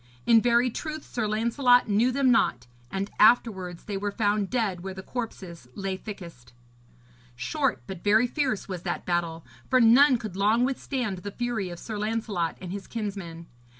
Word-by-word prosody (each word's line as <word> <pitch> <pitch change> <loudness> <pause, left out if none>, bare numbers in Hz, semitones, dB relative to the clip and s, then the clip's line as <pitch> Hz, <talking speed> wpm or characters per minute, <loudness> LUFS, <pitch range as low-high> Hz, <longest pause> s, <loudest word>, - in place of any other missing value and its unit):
In 230 -1 +6
very 240 +1 +3
truth 310 +4 -5
Sir 225 -3 -2
Lancelot 235 +4 +3
knew 220 +5 +3
them 260 0 +3
not; 125 - +2 0.2
and 195 +5 -3
afterwards 190 -6 +3
they 205 -2 -4
were 205 +1 -2
found 205 -2 0
dead 215 -8 -1
where 190 +1 -6
the 190 - -8
corpses 190 - -6
lay 195 -1 -3
thickest. 170 - -10 0.8
Short 270 - -1
but 190 -3 -8
very 215 +4 +4
fierce 255 -4 -1
was 185 -3 -5
that - - -4
battle, 170 -2 -2 0.2
for 255 - +4
none 250 +3 +6
could 215 -5 -7
long 215 +5 +3
withstand 255 -6 -3
the 205 - -6
fury 225 -3 -3
of 175 - -7
Sir 215 +3 -6
Lancelot 210 -6 -2
and 180 -2 -7
his 200 0 -6
kinsmen. 195 -7 -5
210 Hz, 170 wpm, -26 LUFS, 185-240 Hz, 0.8 s, In